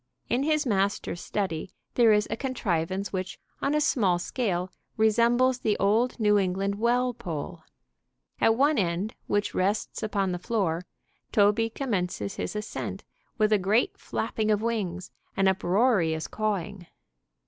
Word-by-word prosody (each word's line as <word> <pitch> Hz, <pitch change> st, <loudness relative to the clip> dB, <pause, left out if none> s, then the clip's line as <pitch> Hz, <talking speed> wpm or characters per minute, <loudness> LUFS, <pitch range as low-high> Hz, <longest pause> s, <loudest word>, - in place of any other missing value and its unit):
In 245 Hz, -, +1 dB
his 305 Hz, +1 st, +1 dB
master's 195 Hz, -5 st, 0 dB
study 185 Hz, -4 st, -3 dB, 0.2 s
there 235 Hz, -3 st, +5 dB
is 210 Hz, 0 st, +3 dB
a -, -, 0 dB
contrivance 195 Hz, -, -2 dB
which, 185 Hz, -1 st, -3 dB, 0.2 s
on 285 Hz, +2 st, +1 dB
a -, -, +3 dB
small 210 Hz, -12 st, +2 dB
scale, 185 Hz, -2 st, -2 dB, 0.3 s
resembles 235 Hz, +4 st, +3 dB
the 215 Hz, -4 st, 0 dB
old 225 Hz, +6 st, +2 dB
New 210 Hz, -2 st, +4 dB
England 195 Hz, +1 st, 0 dB
well 245 Hz, +2 st, +2 dB
pole. 160 Hz, -10 st, -6 dB, 0.8 s
At 225 Hz, -, +4 dB
one 285 Hz, +2 st, +3 dB
end, 180 Hz, +3 st, -1 dB
which 205 Hz, 0 st, 0 dB
rests 200 Hz, +3 st, -1 dB
upon 200 Hz, -3 st, 0 dB
the 180 Hz, -, -3 dB
floor, 180 Hz, -5 st, -1 dB, 0.5 s
Toby 210 Hz, +2 st, +3 dB
commences 185 Hz, -, -3 dB
his -, -, -3 dB
ascent 210 Hz, +1 st, -5 dB, 0.3 s
with 215 Hz, -1 st, +3 dB
a 210 Hz, -, +4 dB
great 205 Hz, +6 st, +2 dB
flapping 220 Hz, -1 st, -2 dB
of 210 Hz, 0 st, +2 dB
wings 185 Hz, -6 st, -2 dB, 0.3 s
and 195 Hz, -1 st, +3 dB
uproarious 190 Hz, -3 st, +2 dB
cawing. 200 Hz, -4 st, -3 dB
210 Hz, 140 wpm, -27 LUFS, 185-230 Hz, 0.8 s, there